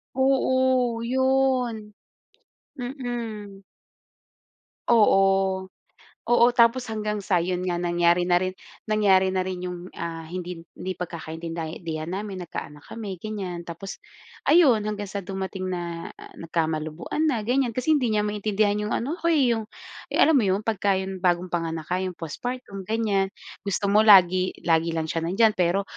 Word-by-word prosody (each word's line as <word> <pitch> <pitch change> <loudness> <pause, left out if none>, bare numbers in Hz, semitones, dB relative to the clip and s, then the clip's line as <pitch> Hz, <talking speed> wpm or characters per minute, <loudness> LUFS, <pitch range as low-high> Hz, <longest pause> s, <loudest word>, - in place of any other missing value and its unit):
Oo, 260 -3 +2
'yon. 255 -3 +1 0.8
Mm. 235 -6 -5 1.3
Oo. 195 -4 +4 0.6
Oo, 240 +1 +4
tapos 240 +1 +4
hanggang 215 -1 -2
sa, 185 -3 +1
'yon 180 +1 -2
nga, 175 - 0
nangyari 175 0 +2
na 175 0 +3
rin 185 0 -3 0.3
nangyari 200 -3 +4
na 185 0 0
rin 185 -1 -4
yung, 180 0 -7
ah, 165 -1 -5
hindi 175 0 -6
hindi 185 0 -5
pagkakaintindihan 165 -1 -5
namin, 200 -1 -5
nagkaanak 150 -2 -7
kami, 200 -6 -6
ganyan, 185 -5 -5
tapos 175 +4 -7 0.5
ayun, 290 -10 +6
hanggang 210 -1 -3
sa 200 0 -5
dumating 190 0 -5
na 170 -2 -4 0.3
nagkamalabuan 160 - -2
na, 240 -8 0
ganyan. 245 0 0
Kasi 255 +5 +1
hindi 250 - 0
niya 210 - +2
maintindihan 210 0 0
yung - - -1
ano 295 +9 -3
ako 335 - -1
eh 265 -5 +3
yung 225 -2 -2 0.5
alam - - +5
mo 215 - +1
'yon? 190 +3 +1
Pagka 205 -3 +1
yung 190 0 -4
bagong 180 -1 +1
panganak 165 -1 -3
ka, 180 - +1
yung 185 -1 -3
postpartum, 195 - -6
ganyan. 215 -3 +1 0.4
Gusto 200 +1 0
mo 210 - +5
lagi 185 -3 +6
lagi 165 0 +2
lang 160 -1 -2
siya 165 0 -2
nandiyan, 215 +5 +4
pero 180 +3 +2
195 Hz, 145 wpm, -25 LUFS, 175-225 Hz, 1.3 s, ayun